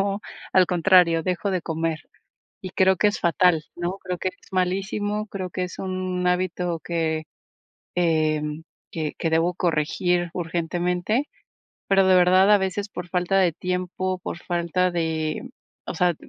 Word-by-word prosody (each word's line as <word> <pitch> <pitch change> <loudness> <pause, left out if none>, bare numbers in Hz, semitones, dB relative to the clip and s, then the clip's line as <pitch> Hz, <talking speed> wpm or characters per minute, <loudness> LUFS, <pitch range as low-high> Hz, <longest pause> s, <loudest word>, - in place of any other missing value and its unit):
sino 200 +1 -1 0.3
al 185 -1 +5
contrario, 175 -2 +4
dejo 185 +3 -1
de 180 -2 -1
comer. 160 -1 -2 0.6
Y 185 -1 -7
creo 190 0 +4
que - - +2
es 205 - -4
fatal, 170 -1 +3
¿no? 175 +3 -3
Creo 180 -1 -4
que 185 - -1
es - - -20
malísimo, 195 +3 -1
creo 185 -3 -5
que 185 +1 -2
es 180 - -9
un 185 -1 -3
hábito 180 -1 0
que, 160 -2 -1 0.7
em, 155 -2 +1 0.3
que 155 -2 -3
que 165 - 0
debo 165 +2 +2
corregir 175 +1 0
urgentemente, 175 - -1 0.6
pero 195 -1 +4
de 185 - +5
verdad 185 +2 +5
a 205 - +7
veces 200 +2 -2
por 180 -3 -7
falta 180 +2 +1
de 180 -3 +3
tiempo, 185 +1 -2
por 175 - -5
falta 175 +1 0
de 160 +5 -2 0.4
o - - -4
sea, 175 +1 +2
180 Hz, 155 wpm, -24 LUFS, 165-185 Hz, 0.7 s, a